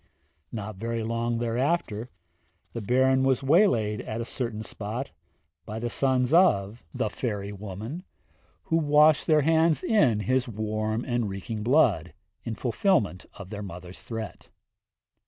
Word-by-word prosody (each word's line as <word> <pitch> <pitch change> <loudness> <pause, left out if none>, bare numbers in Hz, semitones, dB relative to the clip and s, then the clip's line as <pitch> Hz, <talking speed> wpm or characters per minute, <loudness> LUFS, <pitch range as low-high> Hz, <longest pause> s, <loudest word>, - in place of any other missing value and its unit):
Not 105 -2 -6
very 115 +2 -3
long 115 +1 -1
thereafter, 120 0 -1 0.6
the 115 - -4
Baron 130 +4 +3
was 135 0 +2
waylaid 130 - +3
at 110 - -5
a 115 - -3
certain 115 -3 -4
spot 110 +6 -5 0.5
by 110 0 -6
the 120 +1 -3
sons 130 0 +1
of 115 - +3
the - - -1
'fairy' 105 -3 -3
woman, 105 - -6 0.6
who 165 - +1
washed 150 -1 +4
their 155 -2 +5
hands 160 -1 +3
in 130 - +3
his 130 +3 +1
warm 110 +1 -2
and 120 -4 -1
reeking 100 +3 -5
blood, 105 - +2 0.3
in 115 - -4
fulfilment 115 - 0
of 100 -1 -11
their 105 -1 -5
mother's 90 -1 -9
threat. 115 -2 -7
115 Hz, 135 wpm, -27 LUFS, 105-130 Hz, 0.6 s, their